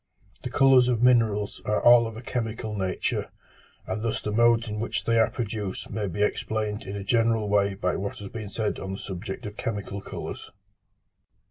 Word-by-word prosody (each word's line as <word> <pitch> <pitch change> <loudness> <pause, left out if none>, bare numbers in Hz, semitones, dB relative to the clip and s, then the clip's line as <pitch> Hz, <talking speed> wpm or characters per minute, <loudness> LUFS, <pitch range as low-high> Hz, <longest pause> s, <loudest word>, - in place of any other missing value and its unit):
The 125 - -4
colours 130 -1 +5
of 120 -2 +1
minerals 110 -5 +3
are 105 - +1
all 120 -1 +7
of 110 -1 -8
a 120 - -8
chemical 115 -2 -3
nature, 95 -2 -2 0.6
and 95 +3 -3
thus 115 -1 -1
the 105 - -4
modes 120 +1 +4
in 105 0 -4
which 115 - -2
they 115 0 +2
are 110 - +4
produced 105 -4 -4
may 105 -2 -2
be 95 +3 -1
explained 105 0 -1
in 100 - -4
a 100 - -4
general 115 0 +2
way 100 -1 +2
by 90 -2 -1
what 100 +1 -4
has 100 -1 -7
been 110 -3 -6
said 105 0 -2
on 95 0 -5
the - - -4
subject 95 +1 -6
of 105 0 -7
chemical 100 -2 -4
colours. - - -7
105 Hz, 195 wpm, -26 LUFS, 100-115 Hz, 0.6 s, all